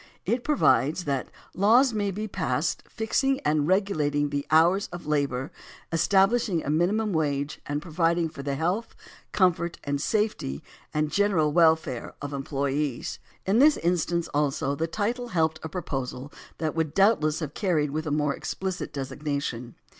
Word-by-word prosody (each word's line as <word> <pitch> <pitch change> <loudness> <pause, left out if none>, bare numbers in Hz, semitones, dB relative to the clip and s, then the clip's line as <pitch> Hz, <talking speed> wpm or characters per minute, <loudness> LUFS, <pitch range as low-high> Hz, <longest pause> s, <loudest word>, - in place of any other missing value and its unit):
It 235 +5 0
provides 155 - +2
that 140 -3 -2 0.2
"laws 230 +6 +4
may 205 -2 0
be 210 +3 -4
passed - - -1
fixing 265 +4 0
and 150 0 +1
regulating 155 -7 +1
the 145 0 -2
hours 170 +6 +4
of 175 0 -8
labor, 140 -3 -1 0.4
establishing 195 +2 +2
a 145 - 0
minimum 200 +7 +1
wage 145 -2 -1
and 145 +1 -2
providing 170 0 +1
for 155 -3 -9
the 140 0 -2
health, 180 +10 -2 0.4
comfort, 175 -3 +1 0.2
safety 180 - -1 0.3
and 150 0 -1
general 190 -7 +2
welfare 160 -7 +2
of 145 0 -6
employees." 140 -1 -2 0.3
In 200 +5 +3
this 295 +2 +6
instance 170 0 0
also 140 -1 0
the 160 +3 -1
title 230 +7 -2
helped 160 -6 0
a 160 - -6
proposal 135 -4 -5 0.2
that 155 -2 -2
would 160 -2 -2
doubtless 190 -7 +3
have 150 -3 -5
carried 160 -8 0
with 155 +2 -3
a - - 0
more 150 -1 +1
expUcit 190 0 -4
designation. 135 -3 -4
160 Hz, 145 wpm, -26 LUFS, 145-195 Hz, 0.4 s, this